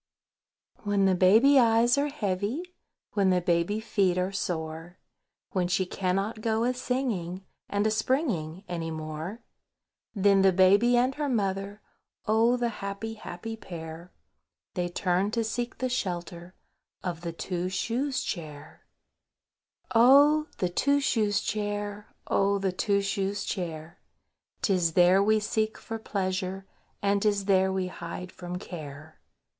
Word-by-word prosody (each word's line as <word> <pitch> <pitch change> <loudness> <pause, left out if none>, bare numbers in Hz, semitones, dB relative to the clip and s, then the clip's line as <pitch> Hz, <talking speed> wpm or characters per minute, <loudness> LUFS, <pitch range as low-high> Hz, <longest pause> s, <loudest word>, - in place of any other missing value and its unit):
WHEN 205 -2 +1
the 190 - +4
baby 220 +10 +6
eyes 235 0 +4
are 285 +1 +1
heavy, 215 - -2 0.5
When 200 -2 +3
the 180 -1 +3
baby 175 +4 +1
feet 195 -5 +1
are 185 +1 0
sore, 165 -2 -4 0.5
When 180 -2 0
she 185 +1 +1
cannot 195 +4 -2
go 225 0 +1
a 250 +1 +1
singing 220 -8 -3 0.2
And 205 +1 0
a 220 - +2
springing 215 - -1
any 170 -2 -3
more, 160 +7 -6 0.7
Then 200 -1 +4
the 190 -1 +5
Baby 200 +7 +5
and 255 +2 +2
her 295 0 -2
mother, 200 -2 -2 0.4
Oh! 225 +3 +3
the 240 -1 0
happy, 200 +3 -4
happy 225 +1 -7
pair! 170 -3 -9 0.6
They 175 -1 -2
turn 180 +2 0
to 230 - +2
seek 240 +2 -3
the 255 - -1
shelter 175 -6 -4 0.5
Of 175 -2 -4
the 170 -1 -4
Two 180 +1 -3
shoes 255 +8 -1
Chair. 155 -5 -7 1.1
Chorus.—Oh! 285 +6 +6
the 180 - 0
Two 280 +10 +2
shoes 210 -7 +1
Chair! 205 0 -3
Oh! 200 0 +2
the 195 -1 0
Two 200 +2 +1
shoes 195 0 -1
Chair! 165 -5 -5 0.6
'Tis 180 -5 +2
there 180 +2 +5
we 215 +2 +3
seek 215 +1 -1
for 225 0 -6
pleasure, 190 -2 -3 0.4
And 200 0 +2
'tis 205 -2 +1
there 190 -1 +3
we 190 -1 -1
hide 180 0 -7
from 180 0 -6
care. 155 -3 -9
195 Hz, 140 wpm, -28 LUFS, 180-220 Hz, 1.1 s, baby